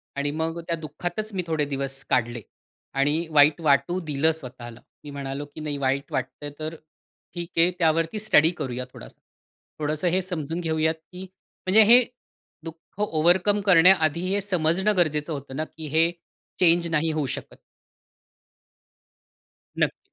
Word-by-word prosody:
आणि 140 +1 -1
मग 160 +2 -3
त्या 170 - 0
दुःखातच 175 +7 -5
मी 185 -2 -2
थोडे 155 -2 0
दिवस 135 -1 -4
काढले 120 -1 0 0.6
आणि 150 +4 +1
वाईट 150 0 +5
वाटू 145 +4 +2
दिलं 150 +1 +2
स्वतःला. 125 -6 -9 0.2
मी 150 - -9
म्हणालो, 140 0 -5
की 145 +2 -11
"नाही 150 -2 -3
वाईट 140 +1 -1
वाटतंय, 130 +3 -4
तर 155 +1 -4 0.6
ठीक 170 -1 -5
आहे, 170 +2 +5
त्यावरती 165 +4 +1
स्टडी 165 -7 +4
करूया 125 -1 -4
थोडासा." - - -13 0.6
थोडंसं 155 +3 -1
हे 185 +2 +1
समजून 165 -3 -4
घेऊयात, 160 -1 0
की 180 +3 -13 0.5
म्हणजे 205 +4 +6
हे 250 +1 +9 0.6
दुःख 165 +4 -12
ओव्हरकम 185 +3 +2
करण्याआधी, 170 -3 +5
हे 200 - +1
समजणं 190 +2 +1
गरजेचं 155 -2 0
होतं 140 -2 -7
ना, 155 - -1
की 160 0 -9
हे 160 +3 +2 0.5
चेंज 170 -1 +4
नाही 160 0 +1
होऊ 155 -2 -1
शकत. - - -11 2.2
नक्कीच, - - +1
160 Hz, 145 wpm, -25 LUFS, 145-175 Hz, 2.2 s, हे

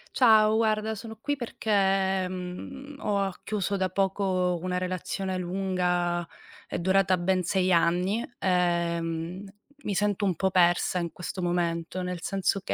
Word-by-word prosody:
Ciao, 220 -3 +6
guarda, 220 -1 +1
sono 220 +1 -8
qui 290 +3 -1
perché, 195 -6 +1
mhmm, 185 +11 -7
ho 205 -6 0
a 195 -2 -2
chiuso 200 -1 -1
da 190 -1 0
poco 185 -1 0
una 180 0 -1
relazione 185 +1 -3
lunga, 180 -2 -1 0.4
è - - -3
durata 190 +1 +3
ben 185 +1 +1
6 185 +1 +1
anni. 180 +6 +2
Ehm, 170 -1 0 0.4
mi 205 - -2
sento 205 +1 +1
un 185 -3 +1
po' 190 +4 +1
persa 180 0 +3
in 170 -1 -3
questo 180 +1 -6
momento, 175 0 -1
nel 180 -1 -4
senso 195 0 0
che, - - -2
185 Hz, 145 wpm, -27 LUFS, 180-200 Hz, 0.4 s, Ciao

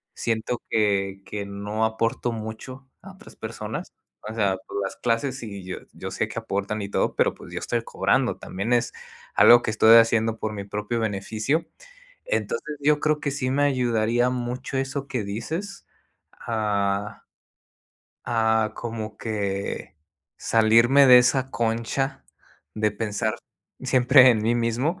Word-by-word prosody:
siento 115 +1 -2
que 100 -3 0
que 100 +1 -5
no 105 +2 -2
aporto 115 +2 -1
mucho 115 +4 -8
a - - -11
otras - - -16
personas. - - -6 0.4
O - - -6
sea, 100 -4 +1 0.3
las 95 - -4
clases 125 +2 -1
y 100 -4 -7
yo 95 - -5 0.2
yo - - -7
sé - - -1
que - - -4
aportan 100 +2 -3
y 100 - -5
todo, - - 0
pero, - - +2
pues - - -13
yo - - -3
estoy - - -2
cobrando, - - 0
también 100 +6 -3
es 120 - +1 0.4
algo 120 0 +8
que - - -1
estoy 110 +1 +7
haciendo 115 -1 +3
por 110 - -3
mi 100 -1 -5
propio 105 +3 -3
beneficio. 110 +8 -1 0.6
Entonces 470 - -2
yo 150 +1 +3
creo 155 0 +1
que 145 - -2
sí 130 -2 -2
me 140 +2 +1
ayudaría 120 -3 +1
mucho 125 +2 -4
eso 135 +1 -3
que 125 -6 -2
dices 160 - -5 0.5
a 105 -2 -2 1.1
a, 110 -1 +2
como 110 -2 -5
que 100 -6 -4 0.4
salirme 115 +5 +4
de 125 -1 +9
esa 125 +2 +2
concha 115 +4 -2 0.5
de 110 0 +1
pensar 110 +1 -2 0.5
siempre 130 0 +6
en 110 -3 +1
mí 115 +2 +2
mismo 120 +9 -1
115 Hz, 145 wpm, -24 LUFS, 105-125 Hz, 1.1 s, de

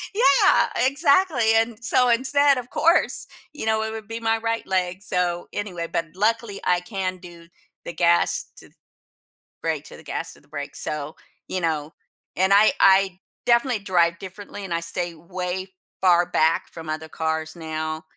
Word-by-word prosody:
Yeah, 415 -4 +5 0.2
exactly, 280 -4 +3
and 225 +1 -1
so 250 +2 +3
instead, 275 +3 +3
of 250 0 -6
course, 335 +2 +2 0.3
you 295 - -6
know, 220 0 +1
it 220 - -3
would 220 -1 -7
be 225 +1 -5
my 225 0 +1
right 225 0 -2
leg, 185 0 -1
so 175 -2 -1
anyway. 180 -5 -4
But 165 - -1
luckily, 215 0 0
I 180 0 +3
can 185 0 -3
do 170 -1 -13 0.4
the 170 - -5
gas 170 0 +2
to - - -13
th - - -32 0.9
brake, - - -2
to - - -11
the - - -14
gas - - -4
to - - -19
the - - -27
brake, 145 0 -5
so, 150 +1 -4 0.3
you 185 - -1
know. 155 -2 -1 0.5
And 190 +2 +3
I 205 +2 +6
I 190 -1 +4 0.3
definitely 235 -1 +3
drive 170 -3 +2
differently 200 +1 -9
and 180 - -4
I 170 - 0
stay 170 0 -4
way 180 +3 -5 0.3
far 175 -2 +5
back 160 -1 +2
from 165 -2 -8
other 155 +1 -4
cars 160 +1 -3
now. 155 -1 -4
185 Hz, 170 wpm, -23 LUFS, 170-225 Hz, 0.9 s, I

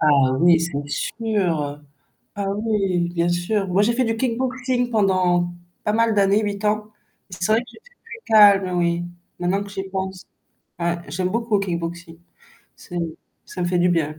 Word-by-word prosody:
Ah 140 -4 +4
oui 170 -1 +6
c'est 145 -4 -3
sûr, 175 -9 -1 0.6
ah 200 -1 -2
oui 195 -5 0
bien 170 0 0
sûr. 190 +4 0
Moi 185 +3 +2
j'ai 235 +3 +2
fait 255 +1 +1
du 225 0 0
kickboxing 255 0 -1
pendant 185 -5 +2 0.3
pas 210 - +1
mal 230 0 +3
d'années, 200 +1 +3
8 205 0 -3
ans, 210 0 0 0.4
c'est 180 +2 -2
vrai 220 - +5
que - - -11
j'étais 485 +2 -19 0.3
très - - -4
calme 195 -4 +6
oui, 170 0 +1 0.4
maintenant 180 +3 0
que 200 - -11
j'y 195 -1 -4
pense. 190 -1 -4 0.5
Ouais, 170 0 0
j'aime 180 +4 -1
beaucoup 230 +1 0
le 195 - -2
kickboxing. 170 -1 -5 0.6
C'est 175 - -7 0.5
ça 180 - -6
me - - 0
fait 180 0 +1
du 175 +1 +3
bien. 155 -3 -1
190 Hz, 175 wpm, -22 LUFS, 175-215 Hz, 0.6 s, oui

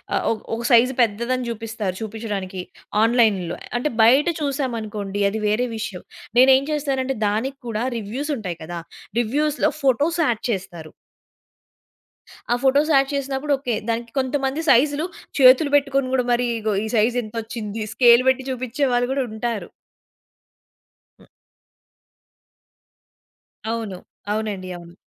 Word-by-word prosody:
ఆహ్, - - 0
ఒ - - +3 0.2
ఒక 235 - -5
సైజు 250 +2 +5
పెద్దదని 235 +3 0
జూపిస్తారు 225 -4 -4
చూపిచ్చడానికి 205 -4 -4 0.4
ఆన్‌లైన్‌లో. 220 -7 +2 0.2
అంటే 300 - -1
బయట 260 +6 +6 0.2
చూసామనుకోండి 225 -8 -3
అది 220 +2 -3
వేరే 215 +4 +1
విషయం. 215 -4 -5 0.4
నేనేం 265 +1 +6
చేస్తానంటే 270 -3 -1
దానిక్కూడా 235 +1 -2
రివ్యూస్ 245 +8 -4
ఉంటాయి 180 -6 -5
కదా! 170 +2 -6 0.4
రివ్యూస్‌లో 295 +6 +1
ఫోటోస్ 290 +6 +2
యాడ్ 235 -5 0
చేస్తారు. 175 -6 -6 1.6
ఆ 240 - +4
ఫోటోస్ 285 +4 +3
యాడ్ 270 0 +4
చేసినప్పుడు 275 +1 -1
ఓకే. 250 -4 -2
దానికి 230 +1 -2
కొంతమంది 270 +3 -1
సైజులు 290 +5 +4 0.4
చేతులు 265 +3 +7
బెట్టుకొని 275 -2 0
కూడా 250 -2 +1
మరీ 245 +1 +2
ఇగో 215 -1 -1
ఈ - - -3
సైజింతొచ్చింది, 225 -1 -2
స్కేల్ 240 0 +6
బెట్టి 260 0 0
చూపిచ్చే 255 +2 -2
వాళ్ళు 245 +1 +1
గూడుంటారు. 235 -4 -3 1.5
హ్మ్. - - -20 2.4
అవును. 225 -5 -3 0.3
అవునండి. 210 -3 -3
అవును. 170 0 -14
240 Hz, 115 wpm, -22 LUFS, 215-265 Hz, 2.4 s, చేతులు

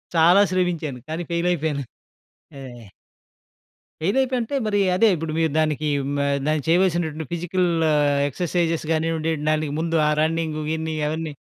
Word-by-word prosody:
చాలా 170 +4 +6
శ్రమించాను. 170 -8 -1
కానీ 160 +2 -3
ఫెయిల్ 170 +1 0
అయిపోయాను. 150 -4 -1 0.8
ఆ! - - -8 1.4
ఫెయిల్ 195 +10 0
అయిపోయా 260 -1 0
అంటే 235 +5 -4
మరి 205 -1 +1 0.2
అదే 225 +5 +4
ఇప్పుడు 160 -1 -4
మీరు 160 -2 +1
దానికి 155 -1 0 0.3
మ - - -1 0.5
చేయవలసినటువంటి 165 -3 +1
ఫిజికల్ 175 +1 0 0.6
ఎక్సర్సైజెస్ 165 +2 -1
కానివ్వండి 160 0 -1 0.2
దానికి 155 -1 0
ముందు 165 0 -1
ఆ - - +3
రన్నింగ్, 160 0 -1
గిన్నింగ్ 160 -1 -2
అవన్నీ 160 -1 -4
165 Hz, 130 wpm, -22 LUFS, 155-175 Hz, 1.4 s, చాలా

